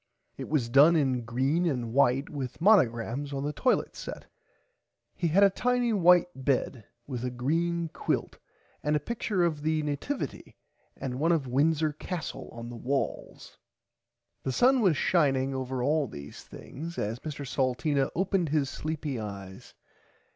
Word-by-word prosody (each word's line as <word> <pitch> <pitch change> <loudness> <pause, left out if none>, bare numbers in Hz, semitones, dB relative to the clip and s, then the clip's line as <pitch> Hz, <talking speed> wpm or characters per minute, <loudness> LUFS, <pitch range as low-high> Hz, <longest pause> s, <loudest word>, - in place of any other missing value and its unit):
It - - -7
was 145 -7 +1
done 140 +7 +6
in 130 -6 +1
green 135 +9 +1
and 120 -7 -2
white 135 +1 +3
with 135 -5 -6
Monagrams 140 - +3
on 135 0 -3
the 145 +1 -2
toilit 255 - +1
set. - - -7 0.9
He 175 - 0
had 185 +6 +4
a 200 - +6
tiny 245 +2 +1
white 180 -3 +6
bed 130 -4 -1 0.2
with 125 -4 -5
a 125 - -1
green 165 +7 -1
quilt - - -3 0.4
and 150 0 +1
a - - +2
picture 205 +1 -1
of 160 -4 0
the 155 0 0
Nativaty 150 - -4 0.4
and 130 -2 -4
one 165 +3 +2
of 160 -5 +1
Windsor 150 +4 +1
Castle 165 +1 -6
on 115 0 -8
the - - -7
walls. 135 +4 -3 0.8
The 130 - -2
sun 255 - +4
was 180 -9 +3
shining 135 -6 +2
over 130 -1 -3
all 150 +1 +2
these 70 -8 -9
things 165 +4 -9
as 110 +3 -2
Mr 145 -1 -6
Salteena 135 +2 0
opened 190 -2 +1
his 145 -2 0
sleepy 155 -4 -4
eyes. 100 -3 -8
145 Hz, 155 wpm, -28 LUFS, 130-170 Hz, 0.9 s, done